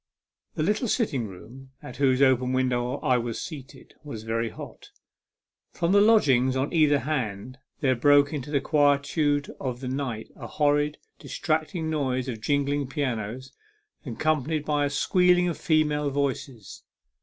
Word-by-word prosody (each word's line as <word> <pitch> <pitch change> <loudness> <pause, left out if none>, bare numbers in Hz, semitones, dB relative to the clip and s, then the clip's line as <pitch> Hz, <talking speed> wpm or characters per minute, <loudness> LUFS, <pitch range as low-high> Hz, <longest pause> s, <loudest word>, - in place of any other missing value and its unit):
THE 155 - -1
little 210 +8 0
sitting 140 - 0
room, 125 +8 -13
at 125 - -9
whose 135 -1 +3
open 130 -1 +3
window 125 -1 0
I 125 -1 +2
was 115 -1 -4
seated, 140 -4 -9
was 115 -8 -7
very 115 +1 -2
hot; - - -11 0.8
from 170 0 -1
the 200 +1 +5
lodgings 135 - +4
on 135 +5 -1
either 150 -3 +4
hand 130 -3 -4 0.2
there 130 -2 +2
broke 145 +3 +4
into 145 -1 -5
the 140 -2 0
quie 145 -1 +3
tude 145 0 -1
of 125 -2 -4
the 130 - -6
night 125 -4 -4
a - - -8
horrid, 145 0 +1 0.2
distracting 160 0 -2
noise 130 -4 -1
of 115 -4 -5
jingling 140 +2 0
pianos, 130 -2 -4 0.5
accompanied 155 +3 -1
by 145 -1 +1
a - - -1
squealing 180 +4 +3
of 170 - -3
female 150 -2 +1
voices. 135 -6 -4
140 Hz, 150 wpm, -26 LUFS, 125-150 Hz, 0.8 s, the